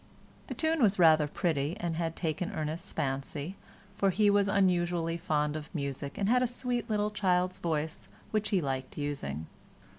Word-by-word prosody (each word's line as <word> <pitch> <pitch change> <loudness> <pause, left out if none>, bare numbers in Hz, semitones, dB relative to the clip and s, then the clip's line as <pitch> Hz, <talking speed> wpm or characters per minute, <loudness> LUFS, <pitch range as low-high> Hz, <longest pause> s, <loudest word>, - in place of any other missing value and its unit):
The - - -5
tune 320 -1 +1
was 205 -4 +4
rather 160 -4 +6
pretty 150 0 -1
and 170 -2 -2
had 165 0 -2
taken 170 +3 -2
Ernest's 155 -1 -4
fancy, 140 +4 -3 0.4
for 195 - +4
he 205 +2 +4
was 200 0 +3
unusually 175 -4 +2
fond 150 -4 0
of 155 -1 -6
music 140 -1 -4
and 200 - 0
had 250 +3 +4
a 250 - +3
sweet 245 -1 -2
little 210 -1 +1
child's 185 -2 +1
voice 160 -2 -2 0.2
which 215 -1 0
he 195 -4 +2
liked 135 -2 -3
using. 110 - -3
170 Hz, 170 wpm, -30 LUFS, 150-200 Hz, 0.4 s, rather